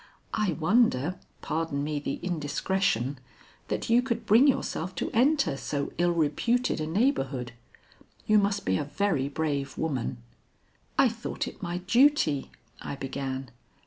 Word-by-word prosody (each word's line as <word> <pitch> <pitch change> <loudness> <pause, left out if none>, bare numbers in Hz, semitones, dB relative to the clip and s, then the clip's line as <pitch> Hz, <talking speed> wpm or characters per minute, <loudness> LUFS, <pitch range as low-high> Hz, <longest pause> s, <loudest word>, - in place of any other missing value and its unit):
I 210 -5 +1
wonder 175 - +2 0.2
pardon 160 -3 -1
me 150 0 -2
the 145 - -3
indiscretion 150 - 0 0.5
that - - -2
you 235 +1 +5
could 250 -2 -3
bring 235 +7 +6
yourself 185 - 0
to - - -2
enter 255 - +3
so 140 +1 -3
ill 175 0 +3
reputed 170 +9 +1
a 155 - -2
neighborhood. 150 - 0 0.7
You 215 0 +5
must 200 0 0
be 95 - +1
a - - -1
very 150 -4 0
brave 145 -2 -2
woman." 140 -7 -2 0.8
"I - - +6
thought - - -4
it - - -9
my 175 +1 -3
duty 190 - +3 0.2
" - - -24
I - - -5
began. 135 -1 -4
160 Hz, 145 wpm, -28 LUFS, 140-210 Hz, 0.8 s, bring